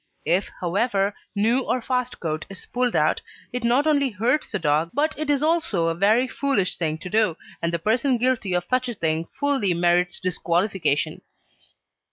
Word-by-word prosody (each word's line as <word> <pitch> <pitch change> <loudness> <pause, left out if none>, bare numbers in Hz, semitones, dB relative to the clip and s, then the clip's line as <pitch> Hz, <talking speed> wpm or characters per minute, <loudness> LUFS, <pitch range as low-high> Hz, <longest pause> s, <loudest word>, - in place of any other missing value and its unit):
If, 175 +5 +1
however, 195 +2 0 0.2
new 225 +5 +3
or 255 - 0
fast 250 +1 -2
coat 155 -2 -3
is 195 - -9
pulled 250 -1 -1
out - - +2 0.3
it 250 -1 -3
not 245 +5 +3
only 285 -3 +3
hurts 240 +7 0
the 210 - 0
dog 155 -1 +1
but 305 +2 +1
it 305 0 -4
is 285 0 +2
also 315 - +1
a 165 - +1
very 215 +8 +3
foolish 260 -10 0
thing 160 -2 -1
to 170 - -8
do, 215 -6 +2 0.2
and 170 - 0
the 170 - 0
person 235 - +1
guilty 230 -6 0
of 175 0 -1
such 255 0 0
a 240 - -4
thing 160 -2 -1
fully 270 -11 +2
merits 175 +1 +2
disqualification. 175 -3 0
205 Hz, 180 wpm, -24 LUFS, 175-255 Hz, 0.3 s, new